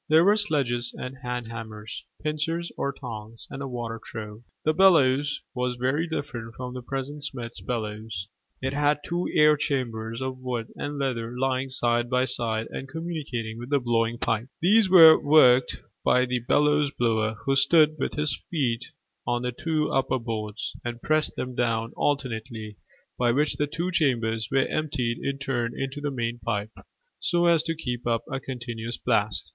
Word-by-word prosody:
There 160 Hz, +2 st, +6 dB
were 205 Hz, +2 st, +6 dB
sledges 130 Hz, -, +1 dB
and 125 Hz, +1 st, -6 dB
hand 125 Hz, -2 st, -4 dB
hammers, 110 Hz, -1 st, -7 dB, 0.2 s
pincers 165 Hz, +3 st, -1 dB
or 140 Hz, -, -1 dB
tongs, 115 Hz, -4 st, -8 dB
and 135 Hz, -, -6 dB
a 140 Hz, -, -3 dB
water 120 Hz, -3 st, -5 dB
trough. 105 Hz, -2 st, -7 dB, 0.3 s
The 155 Hz, -, +3 dB
bellows 145 Hz, -6 st, +4 dB
was 125 Hz, -1 st, -1 dB
very 135 Hz, +7 st, 0 dB
different 120 Hz, -8 st, -5 dB
from 125 Hz, -1 st, -6 dB
the 130 Hz, -, -5 dB
present 135 Hz, +3 st, -5 dB
smith's 120 Hz, -4 st, -5 dB
bellows: 110 Hz, -4 st, -4 dB, 0.4 s
it 135 Hz, +1 st, -1 dB
had 145 Hz, +1 st, +2 dB
two 175 Hz, +1 st, -1 dB
air 150 Hz, 0 st, +6 dB
chambers 115 Hz, -6 st, -2 dB
of 130 Hz, -1 st, -4 dB
wood 125 Hz, -3 st, -4 dB
and 145 Hz, 0 st, -4 dB
leather 125 Hz, -3 st, -2 dB
lying 130 Hz, 0 st, 0 dB
side 120 Hz, -1 st, +1 dB
by 125 Hz, 0 st, +2 dB
side 115 Hz, -3 st, -1 dB
and 135 Hz, -, -6 dB
communicating 140 Hz, -8 st, -4 dB
with 120 Hz, +2 st, -7 dB
the 140 Hz, -1 st, +3 dB
blowing 115 Hz, -1 st, +1 dB
pipe. 115 Hz, 0 st, -1 dB
These 205 Hz, +3 st, +4 dB
were 165 Hz, -4 st, +9 dB
worked 130 Hz, -4 st, +5 dB, 0.2 s
by 125 Hz, -, +4 dB
a 125 Hz, -1 st, 0 dB
bellows 145 Hz, +4 st, +3 dB
blower, 110 Hz, -4 st, 0 dB
who 135 Hz, -1 st, +2 dB
stood 155 Hz, +2 st, +4 dB
with -, -, -2 dB
his 150 Hz, -4 st, 0 dB
feet 130 Hz, -8 st, 0 dB, 0.4 s
on 120 Hz, 0 st, 0 dB
the 125 Hz, -, -1 dB
two 155 Hz, +4 st, -1 dB
upper 135 Hz, 0 st, +1 dB
boards, 110 Hz, -3 st, -4 dB
and 120 Hz, 0 st, -4 dB
pressed 155 Hz, +4 st, +1 dB
them 125 Hz, 0 st, -4 dB
down 115 Hz, -1 st, 0 dB
alternately, 115 Hz, -6 st, -2 dB, 0.4 s
by 120 Hz, -1 st, +3 dB
which 145 Hz, +5 st, +1 dB
the 150 Hz, -, +1 dB
two 170 Hz, +5 st, -2 dB
chambers 115 Hz, -, +1 dB
were 135 Hz, -1 st, +3 dB
emptied 125 Hz, -6 st, -1 dB
in 140 Hz, 0 st, -1 dB
turn 120 Hz, -4 st, -2 dB
into 135 Hz, +2 st, -3 dB
the 145 Hz, -, -1 dB
main 120 Hz, -3 st, -3 dB
pipe, 105 Hz, -2 st, -2 dB, 0.5 s
so 175 Hz, 0 st, +2 dB
as 170 Hz, -2 st, +5 dB
to 165 Hz, 0 st, -2 dB
keep 125 Hz, -6 st, -4 dB
up 115 Hz, -1 st, +1 dB
a 135 Hz, -, -1 dB
continuous 120 Hz, -3 st, -5 dB
blast. 105 Hz, -5 st, 0 dB
125 Hz, 175 wpm, -26 LUFS, 115-145 Hz, 0.5 s, were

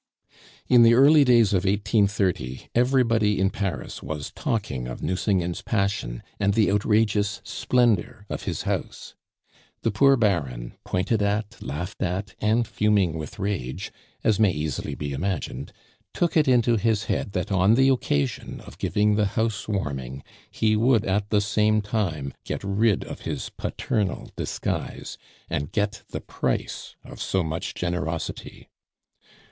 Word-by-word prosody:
In 125 Hz, -2 st, +6 dB
the 115 Hz, 0 st, +7 dB
early 145 Hz, +4 st, +7 dB
days 120 Hz, -6 st, +4 dB
of 95 Hz, -2 st, +2 dB
1830 100 Hz, -, 0 dB
everybody 115 Hz, -4 st, +3 dB
in 95 Hz, +1 st, +2 dB
Paris 100 Hz, -2 st, -4 dB
was 75 Hz, -2 st, -5 dB
talking 85 Hz, -, -2 dB
of 60 Hz, -, -7 dB
Nucingen's 90 Hz, 0 st, 0 dB
passion 100 Hz, -, -1 dB, 0.2 s
and 100 Hz, 0 st, +2 dB
the 110 Hz, -3 st, +3 dB
outrageous 105 Hz, 0 st, +2 dB
splendor 120 Hz, -3 st, +1 dB
of -, -, -4 dB
his -, -, -3 dB
house. -, -, -4 dB, 0.7 s
The 115 Hz, -, +2 dB
poor 135 Hz, +6 st, +5 dB
Baron, 70 Hz, -, 0 dB
pointed 100 Hz, +4 st, 0 dB
at, 105 Hz, +2 st, -1 dB
laughed 80 Hz, +9 st, -5 dB
at, 95 Hz, +3 st, -2 dB
and 110 Hz, +2 st, +2 dB
fuming 105 Hz, -7 st, +2 dB
with 80 Hz, -2 st, -6 dB
rage, 95 Hz, -, -3 dB, 0.3 s
as 110 Hz, -1 st, +2 dB
may 110 Hz, -3 st, +5 dB
easily 75 Hz, -4 st, -3 dB
be 70 Hz, -1 st, -4 dB
imagined, 85 Hz, +2 st, -3 dB, 0.4 s
took 175 Hz, -, 0 dB
it 155 Hz, -3 st, +4 dB
into 120 Hz, -2 st, +4 dB
his 110 Hz, 0 st, +1 dB
head 100 Hz, -, -2 dB
that 90 Hz, +3 st, -2 dB
on 95 Hz, +3 st, +4 dB
the 135 Hz, +2 st, +5 dB
occasion 70 Hz, -, -1 dB
of -, -, -13 dB
giving 105 Hz, 0 st, +2 dB
the 105 Hz, -1 st, +3 dB
house 110 Hz, -3 st, 0 dB
warming 70 Hz, -, -3 dB, 0.3 s
he 110 Hz, -1 st, +1 dB
would 115 Hz, 0 st, +3 dB
at 100 Hz, +2 st, 0 dB
the 105 Hz, -1 st, +3 dB
same 105 Hz, +1 st, +2 dB
time 95 Hz, -, -2 dB
get -, -, -4 dB
rid 100 Hz, +1 st, +2 dB
of -, -, -8 dB
his -, -, -4 dB
paternal 105 Hz, -3 st, -2 dB
disguise, -, -, -4 dB, 0.3 s
and 70 Hz, +4 st, -3 dB
get 105 Hz, +1 st, -1 dB
the -, -, -5 dB
price -, -, -3 dB
of -, -, -10 dB
so 95 Hz, -2 st, 0 dB
much 80 Hz, +2 st, -4 dB
generosity. 85 Hz, -2 st, -4 dB
100 Hz, 145 wpm, -25 LUFS, 90-110 Hz, 0.7 s, the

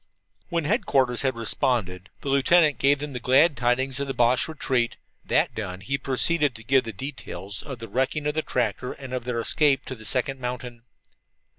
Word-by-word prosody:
When 170 Hz, -2 st, 0 dB
headquarters 140 Hz, -, +1 dB
had 130 Hz, -2 st, 0 dB
responded, 105 Hz, -5 st, -1 dB
the 140 Hz, -, -4 dB
lieutenant 145 Hz, +3 st, +4 dB
gave 140 Hz, +1 st, +4 dB
them 145 Hz, 0 st, -6 dB
the 125 Hz, -, -4 dB
glad 140 Hz, +6 st, +4 dB
tidings 125 Hz, +2 st, +1 dB
of 140 Hz, -, -2 dB
the 135 Hz, -, -3 dB
Boche 120 Hz, +1 st, +3 dB
retreat. 130 Hz, -6 st, -1 dB, 0.3 s
That -, -, +1 dB
done, 95 Hz, -4 st, -5 dB
he 135 Hz, +9 st, -2 dB
proceeded 145 Hz, +1 st, +2 dB
to 115 Hz, -, -11 dB
give 135 Hz, +1 st, +3 dB
the 115 Hz, -, -4 dB
details 100 Hz, -5 st, -7 dB
of 135 Hz, -4 st, -7 dB
the 115 Hz, 0 st, -8 dB
wrecking 135 Hz, +5 st, -1 dB
of 150 Hz, -, 0 dB
the 155 Hz, -, 0 dB
tractor 125 Hz, -2 st, -2 dB
and 135 Hz, -2 st, -9 dB
of 125 Hz, -2 st, -3 dB
their 125 Hz, -2 st, -2 dB
escape 135 Hz, +3 st, +2 dB
to -, -, -5 dB
the 110 Hz, -4 st, -11 dB
second 130 Hz, +4 st, -1 dB
mountain. 125 Hz, -1 st, -6 dB
130 Hz, 190 wpm, -25 LUFS, 120-140 Hz, 0.3 s, lieutenant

